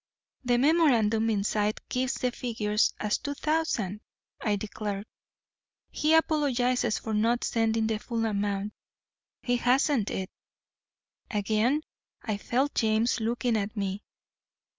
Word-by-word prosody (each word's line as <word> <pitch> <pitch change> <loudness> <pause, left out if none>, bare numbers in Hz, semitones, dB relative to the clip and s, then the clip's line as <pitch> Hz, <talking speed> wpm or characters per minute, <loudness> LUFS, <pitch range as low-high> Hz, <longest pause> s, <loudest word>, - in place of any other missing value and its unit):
'The 245 -1 +3
memorandum 240 -7 +3
inside 210 0 0
gives 255 0 -1
the 250 - -1
figures 220 -3 0
as 210 -1 0
two 285 0 -4
thousand,' 280 - -1 0.4
I 210 -2 +1
declared. 205 0 -4 0.9
'He 310 +2 +3
apologises 255 -7 +2
for 220 - -4
not 230 +3 +2
sending 225 -1 +1
the 220 -1 -1
full 230 0 -2
amount. 205 -1 -1 0.7
He 245 -1 +1
hasn't 250 -2 +2
it.' 190 0 -4 1.0
Again 220 +7 +1 0.4
I 215 -3 -2
felt 260 +7 0
James 225 +2 +2
looking 235 +1 0
at 210 +1 -2
me. 195 0 -2
225 Hz, 120 wpm, -28 LUFS, 210-250 Hz, 1.0 s, The